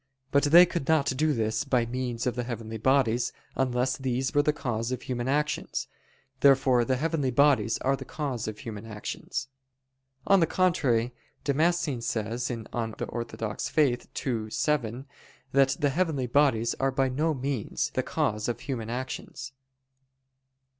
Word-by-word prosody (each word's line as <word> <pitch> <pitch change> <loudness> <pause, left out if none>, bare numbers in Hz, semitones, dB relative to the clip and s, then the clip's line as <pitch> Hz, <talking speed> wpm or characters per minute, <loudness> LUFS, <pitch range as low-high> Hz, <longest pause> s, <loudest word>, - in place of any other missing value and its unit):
But 140 - +4
they 170 +5 +8
could 170 -5 -4
not 155 -4 +3
do 155 +3 +2
this 110 -3 0
by 125 -4 +1
means 120 0 -3
of 125 -2 0
the 125 - -1
heavenly 115 -2 -5
bodies, 125 -1 +2 0.2
unless 130 0 0
these 130 0 -1
were 145 - +5
the 150 - +2
cause 120 -5 -3
of 130 - -3
human 120 -1 -3
actions. 150 +2 -1 0.5
Therefore 135 -3 +5
the 130 +2 +1
heavenly 150 -1 0
bodies 135 -2 +3
are 135 +1 +2
the - - -8
cause 135 -8 -4
of 110 -1 -5
human 105 -2 -7
actions. 105 +4 -5 0.8
On 195 -1 +5
the 165 - +3
contrary, 130 -11 +1 0.3
Damascene 150 -2 +1
says 115 +2 -2
(De 115 -3 -4
Fide 115 -2 -3
Orth. 120 +3 -1
ii, 115 -5 -2
7) 130 -1 -1 0.5
that 135 0 +4
"the 145 - +2
heavenly 155 -4 0
bodies 120 -3 +2
are 135 0 +2
by 135 0 +1
no 150 +5 0
means 135 -4 -2
the - - +1
cause 105 0 -1
of 120 - -3
human 115 -6 -4
actions." 130 +1 -5
130 Hz, 155 wpm, -27 LUFS, 115-140 Hz, 0.8 s, they